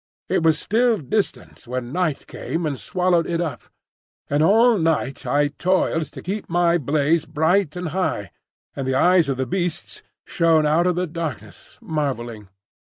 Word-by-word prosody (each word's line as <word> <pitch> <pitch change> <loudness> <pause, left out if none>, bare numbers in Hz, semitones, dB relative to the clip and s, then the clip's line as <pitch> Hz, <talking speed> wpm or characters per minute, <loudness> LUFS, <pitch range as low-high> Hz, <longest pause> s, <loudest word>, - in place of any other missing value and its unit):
It - - +1
was 160 -1 +3
still 230 +5 +2
distant 195 - -3
when 125 0 -4
night 175 -6 -1
came 165 0 -4
and 140 -4 -2
swallowed 180 -2 +1
it 170 -1 -1
up; 150 -10 -3 0.7
and 145 +1 +2
all 225 +6 +5
night 160 -5 -1
I 145 0 +2
toiled 165 0 0
to - - -9
keep 200 +3 -4
my 175 0 +2
blaze 150 +3 +1
bright 160 +2 +1
and 180 -2 -4
high, 145 - -2 0.4
and 135 -1 -4
the 130 - 0
eyes 175 +1 +4
of 135 - -1
the 130 - -1
Beasts 175 +4 -3 0.2
shone 165 -2 +2
out 160 +4 +3
of 180 - +1
the 180 +1 0
darkness, 150 - -7
marvelling. 120 - -3
160 Hz, 160 wpm, -22 LUFS, 140-180 Hz, 0.7 s, all